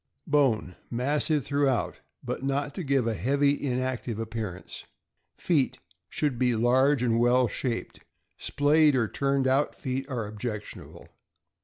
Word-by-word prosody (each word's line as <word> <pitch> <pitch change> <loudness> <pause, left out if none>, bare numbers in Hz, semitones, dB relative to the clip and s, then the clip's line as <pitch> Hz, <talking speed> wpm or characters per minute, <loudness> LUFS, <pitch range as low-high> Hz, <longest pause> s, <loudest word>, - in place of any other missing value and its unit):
Bone. 135 - +1
— - - -37
Massive 145 +4 0
throughout, 140 -3 0 0.3
but - - -4
not 140 +1 -1
to 185 - -5
give 135 -4 +1
a 115 - 0
heavy, 140 - +1
inactive 130 -3 -2
appearance. 110 -5 -5 0.5
Feet. 150 -7 +1 0.2
— - - -47
Should 145 -6 -1
be 125 -2 +2
large 130 +4 +3
and 115 -2 +2
well 120 +1 +4
shaped. 120 0 -4 0.4
Splayed 150 0 +3
or 120 -3 +2
turned 135 +1 0
out 135 +3 +2
feet 135 +1 -4
are 120 -5 -2
objectionable. 105 0 -7
130 Hz, 140 wpm, -27 LUFS, 115-140 Hz, 0.5 s, well